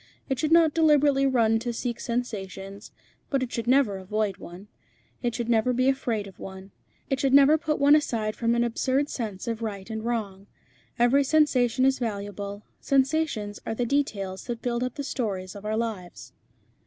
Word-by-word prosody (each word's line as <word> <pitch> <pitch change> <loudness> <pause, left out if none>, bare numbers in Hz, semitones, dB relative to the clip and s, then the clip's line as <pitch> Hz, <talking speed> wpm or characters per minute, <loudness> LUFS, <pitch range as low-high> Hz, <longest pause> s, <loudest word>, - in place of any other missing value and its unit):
It 265 -2 -1
should 310 +3 0
not 325 -2 +5
deliberately 290 -4 +4
run 225 -4 +3
to 240 +1 -3
seek 235 0 -4
sensations, 200 -4 -5 0.4
but 275 -2 0
it 250 - -5
should 230 -1 -4
never 250 -6 +3
avoid 200 +1 -2
one; 180 +4 -11 0.5
it 240 -2 -1
should 235 -2 -3
never 235 +1 +2
be 255 +2 +1
afraid 235 -6 -1
of 195 - -13
one; 190 0 -9 0.4
it 270 - +1
should 270 -1 +3
never 280 +2 +7
put 310 -1 -1
one 285 +1 +6
aside 225 -8 0
from 230 0 +1
an 235 - +2
absurd 260 +4 0
sense 215 -3 -5
of 230 -1 -3
right 200 -4 -5
and 220 0 -4
wrong. 205 -5 -3 0.5
Every 245 +4 +4
sensation 260 -4 +3
is 270 -1 +2
valuable. 205 -2 -5 0.2
Sensations 270 -7 0
are 225 - -3
the 245 - -1
details 200 -8 -2
that 235 -1 -5
build 240 0 -1
up 255 -1 -3
the 285 - -4
stories 195 -9 -3
of 205 0 -10
our 215 +1 -1
lives." 215 -6 -5
235 Hz, 180 wpm, -26 LUFS, 205-270 Hz, 0.5 s, never